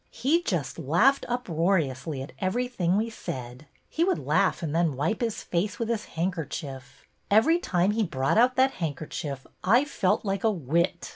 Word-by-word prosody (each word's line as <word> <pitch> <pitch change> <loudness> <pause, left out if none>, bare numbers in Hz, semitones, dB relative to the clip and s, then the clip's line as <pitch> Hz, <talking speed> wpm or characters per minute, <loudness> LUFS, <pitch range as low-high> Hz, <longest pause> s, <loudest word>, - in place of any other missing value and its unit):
He 285 +9 +1
just 170 - -2
laughed 175 - +3
uproariously 165 - -1
at 135 - -10
everything 195 -2 0
we 225 +2 -1
said. 125 - -7 0.2
He 330 - 0
would 370 +1 +2
laugh - - +1
and 155 -2 -2
then 165 -4 +2
wipe 160 - -1
his 230 -3 -2
face 200 +6 -1
with 230 -2 -3
his 230 -3 -2
handker 170 -3 -1
chief. 135 -5 -8 0.2
Every 295 +12 +4
time 180 - +1
he 220 +2 0
brought 140 -1 +1
out 250 +2 +4
that 265 +1 +4
hand 150 -4 -1
kerchief 140 -3 -6 0.2
I 240 +9 +4
felt 210 -8 0
like 195 -1 -1
a 225 - +4
wit. 170 0 -1
185 Hz, 175 wpm, -27 LUFS, 155-230 Hz, 0.2 s, Every